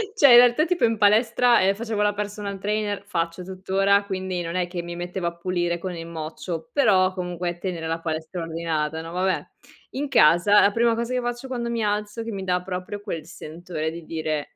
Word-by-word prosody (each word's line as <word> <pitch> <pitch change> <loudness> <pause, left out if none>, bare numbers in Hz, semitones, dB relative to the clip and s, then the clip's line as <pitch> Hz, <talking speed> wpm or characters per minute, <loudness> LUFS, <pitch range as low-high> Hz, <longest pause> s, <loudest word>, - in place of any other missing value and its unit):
Cioè 285 - +7
in - - +10
realtà 245 +5 +6
tipo 360 0 -1
in 225 -1 0
palestra, 230 +3 +4
ehm, 195 +1 +3
facevo 220 -1 -3
la 205 0 +2
personal 205 -1 -5
trainer 205 0 -2
faccio 170 -1 -3
tuttora, 195 +2 +1
quindi 185 -2 -3
non 170 +1 -5
è 180 -1 0
che 175 -1 -4
mi 170 0 -7
mettevo 175 0 -4
a 170 - -3
pulire 175 -1 -1
con 180 0 -5
il 165 0 -7
mocio, 160 +1 -6
però 190 -9 +4
comunque 180 -1 -4
tenere 175 -4 -4
la 165 +1 -2
palestra 160 +2 -4
ordinata, 160 -1 -2
no, 165 0 -8
vabbè. 185 +2 0 0.5
In 285 +1 -3
casa 200 - +5
la 200 - +4
prima 230 +1 +2
cosa 235 +2 -3
che 250 - 0
faccio 240 +2 -4
quando 240 -2 -3
mi 230 -1 -1
alzo, 210 +2 -2
che 230 - -5
mi 195 -2 -5
dà 180 -1 0
proprio 185 +2 -5
quel 170 -7 -5
sentore 160 0 -6
di 170 0 -8
dire: 155 -2 -3
185 Hz, 205 wpm, -24 LUFS, 170-210 Hz, 0.5 s, in